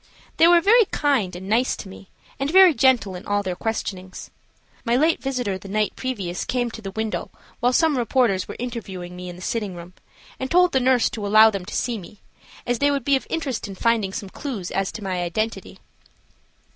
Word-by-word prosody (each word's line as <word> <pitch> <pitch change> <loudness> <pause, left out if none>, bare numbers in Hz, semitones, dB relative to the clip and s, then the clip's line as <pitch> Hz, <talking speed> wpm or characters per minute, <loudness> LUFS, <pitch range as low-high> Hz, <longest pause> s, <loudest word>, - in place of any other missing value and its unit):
They 330 - +6
were 345 0 +6
very 455 +5 +5
kind 265 - 0
and 185 +2 -8
nice 235 +5 +2
to - - -9
me, 190 0 -13 0.3
and 275 +1 -1
very 370 0 +7
gentle 250 -6 +3
in 180 +1 -8
all 205 0 0
their 185 -2 -3
questionings. 190 -3 -5 0.5
My 235 -1 +1
late 315 +6 +2
visitor 245 -8 -2
the 195 - -11
night 210 +1 0
previous 195 -9 -4
came 245 -2 -1
to 220 - -9
the 195 - -6
window 220 +2 -3 0.3
while 245 - +2
some 320 +2 +3
reporters 230 -5 +1
were - - -7
interviewing 195 -8 -6
me 180 0 -7
in 175 - -8
the 180 - -11
sitting 210 -5 -3
room, 175 +1 -10 0.5
and 260 - -3
told 360 0 +4
the 265 - +2
nurse 255 -2 +3
to 215 -5 -4
allow 215 +2 +7
them 195 -3 -5
to - - -7
see 235 -3 -1
me, 195 +3 -13 0.5
as 245 -1 -1
they 285 - +3
would 280 -3 -1
be 280 - +4
of 265 - -3
assistance 275 -10 -3
in 195 - -8
finding 230 -4 +1
some 195 0 -6
clew 240 -3 -6
as 195 0 -1
to 220 - -8
my 185 -2 -2
identity. 215 +6 -3
225 Hz, 210 wpm, -23 LUFS, 195-260 Hz, 0.5 s, very